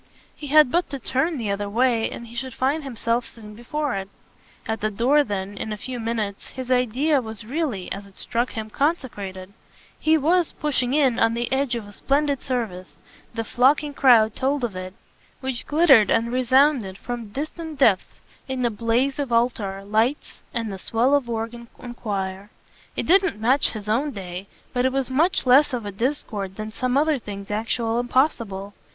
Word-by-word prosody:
He 295 - -8
had 300 -2 +6
but 350 +1 +1
to 280 - -4
turn 270 +6 -1
the 220 -5 -2
other 200 0 -2
way 230 +1 +2
and 235 - -8
he 235 +1 -12
should 260 0 -5
find 285 +4 0
himself 235 -2 -1
soon 215 -3 -11
before 280 +6 -3
it. 195 0 -4 0.6
At 220 0 -3
the 215 - +1
door 250 +8 +3
then, 200 -3 -4
in 220 - -5
a 210 - -3
few 250 +4 -6
minutes, 225 -3 -3
his 260 -1 -6
idea 255 +4 +2
was 220 -1 -8
really 255 - -3
as 200 0 -5
it 195 - -20
struck 240 +1 -2
him 220 -1 -5
consecrated: 205 - -2 0.5
he 315 +1 +4
was, 335 +3 +2
pushing 265 -3 0
in, 265 -5 +3
on 225 0 +3
the 240 +2 -2
edge 265 -2 +1
of 225 -3 -5
a - - -11
splendid 280 +3 0
service 220 -9 -4 0.4
the 225 - -1
flocking 280 +6 +2
crowd 235 -6 +5
told 275 +1 0
of 225 -6 -2
it 185 +1 -6 0.4
which 260 -3 -4
glittered 290 -8 +6
and 230 +1 +2
resounded, 255 -5 +3
from 240 0 -5
distant 310 +5 -5
depths, 220 -9 +3 0.3
in 260 -1 -2
the 240 - +2
blaze 235 +6 0
of 275 -4 -2
altar 220 -5 0
lights 220 +7 0
and 230 -4 -3
the 190 - -7
swell 235 +7 +1
of 280 -4 +2
organ 230 +1 -4
and 240 -1 -8
choir. 195 -3 -4 0.5
It - - -2
didn't 380 - +3
match 255 +6 +3
his 215 -2 -7
own 245 +8 +1
day, 185 -1 -7 0.3
but 245 - +1
it 260 - +2
was 265 -2 -1
much 320 +6 +2
less 270 +3 +5
of 235 -4 -3
a 205 - -4
discord 205 -4 -3
than 215 +1 -6
some 255 +3 0
other 300 -1 +2
things 200 -2 -8
actual 225 +2 0
and 245 0 -3
possible. 215 -8 0
240 Hz, 190 wpm, -23 LUFS, 215-275 Hz, 0.6 s, had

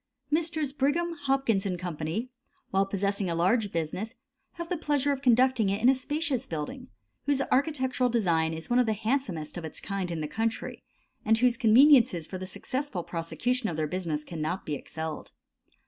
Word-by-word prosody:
Messrs. 315 -3 0
Brigham, 310 +5 +1
Hopkins 270 -9 +1
& - - -4
Co., 175 -2 -4 0.8
while 195 +1 +2
possessing 200 -1 -1
a 170 - -1
large 200 +5 +2
business, 175 +8 -3 0.4
have 340 0 -6
the 360 - -1
pleasure 290 -3 +1
of 275 -1 -2
conducting 250 -4 +4
it 200 +1 0
in 240 - +5
a - - +7
spacious 270 -1 -1
building, 210 - -5 0.4
whose 285 -1 +2
architectural 260 -2 +1
design 170 -9 +2
is 160 0 -6
one 245 +1 +3
of 250 - +3
the 220 - +2
handsomest 215 - -2
of 175 - -5
its 160 - -6
kind 195 -3 -3
in 170 -2 -3
the 150 - -2
country, 225 +8 -3 0.4
and 225 +1 +3
whose 245 +1 +3
conveniences 240 - +6
for 185 - -6
the 185 - -5
successful 255 -3 -4
prosecution 220 +10 -1
of 160 - -4
their 155 - +1
business 155 -2 -2
cannot 160 +3 -4
be 150 - -3
excelled. 160 +2 -6
225 Hz, 180 wpm, -28 LUFS, 175-270 Hz, 0.8 s, a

